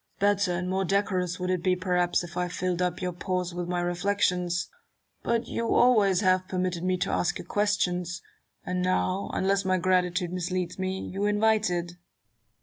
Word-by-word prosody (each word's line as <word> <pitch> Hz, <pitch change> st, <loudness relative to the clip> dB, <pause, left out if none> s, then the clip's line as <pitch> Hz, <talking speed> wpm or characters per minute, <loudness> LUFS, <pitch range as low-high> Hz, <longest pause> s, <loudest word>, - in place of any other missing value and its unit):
Newton. 200 Hz, -, +4 dB
Better 200 Hz, -2 st, 0 dB
and 180 Hz, +1 st, -2 dB
more 190 Hz, +1 st, 0 dB
decorous 190 Hz, -1 st, 0 dB
would 180 Hz, 0 st, -1 dB
it 180 Hz, -2 st, 0 dB
be, 185 Hz, 0 st, +2 dB
perhaps, 180 Hz, -1 st, +1 dB
if 175 Hz, -, -9 dB
I 180 Hz, 0 st, 0 dB
filled 180 Hz, 0 st, -2 dB
up 180 Hz, 0 st, -1 dB
your 180 Hz, -, -1 dB
pause 180 Hz, 0 st, -2 dB
with 175 Hz, 0 st, -4 dB
my 175 Hz, 0 st, -1 dB
reflections: 175 Hz, -1 st, 0 dB, 0.5 s
but 235 Hz, 0 st, 0 dB
you 230 Hz, 0 st, -1 dB
always 210 Hz, -6 st, +4 dB
have 185 Hz, -1 st, +2 dB
permitted 180 Hz, -2 st, -2 dB
me 185 Hz, 0 st, +1 dB
to -, -, -1 dB
ask 175 Hz, 0 st, 0 dB
you -, -, -8 dB
questions; 180 Hz, -3 st, 0 dB, 0.4 s
and 180 Hz, 0 st, -1 dB
now, 185 Hz, +1 st, 0 dB
unless 195 Hz, +1 st, +1 dB
my 185 Hz, 0 st, +2 dB
gratitude 180 Hz, -1 st, +1 dB
misleads 180 Hz, 0 st, -3 dB
me, 190 Hz, 0 st, -2 dB
you 195 Hz, +2 st, -3 dB
invite 215 Hz, 0 st, +2 dB
it. 175 Hz, -1 st, -2 dB
185 Hz, 180 wpm, -27 LUFS, 180-195 Hz, 0.5 s, Newton